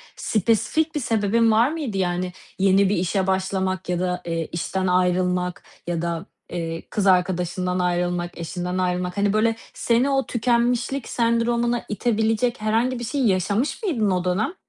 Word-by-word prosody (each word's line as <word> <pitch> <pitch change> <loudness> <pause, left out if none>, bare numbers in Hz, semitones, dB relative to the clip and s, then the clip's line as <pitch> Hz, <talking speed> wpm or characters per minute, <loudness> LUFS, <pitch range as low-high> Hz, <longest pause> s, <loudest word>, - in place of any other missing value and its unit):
spesifik 230 - +1
bir - - +1
sebebin 225 -1 +2
var 230 +6 +4
mıydı? 280 -12 -3
Yani, 180 -1 -1 0.3
yeni 195 0 +4
bir 205 - +2
işe 185 +2 0
başlamak 190 -1 -1
ya 175 -1 0
da, 180 0 -1
eee, 165 -1 -2
işten 185 +2 -2
ayrılmak 180 0 +1 0.2
ya 170 -1 -1
da, 170 -1 -3 0.2
eee, 165 -1 -4
kız 200 -2 0
arkadaşından 180 0 +1
ayrılmak, 175 0 -1
eşinden 180 +2 -4
ayrılmak, 180 0 -1
hani, 200 0 +2
böyle, 225 +1 +2 0.2
seni 240 +4 +2
o 270 -1 +1
tükenmişlik 240 +2 0
sendromuna 235 0 +1
itebilecek 225 +2 0
herhangi 235 +4 +1
bir - - -5
şey 275 +4 -2
yaşamış 200 - 0
mıydın 225 - +1
o 180 -1 0
dönem? 220 - 0
195 Hz, 150 wpm, -23 LUFS, 180-235 Hz, 0.3 s, var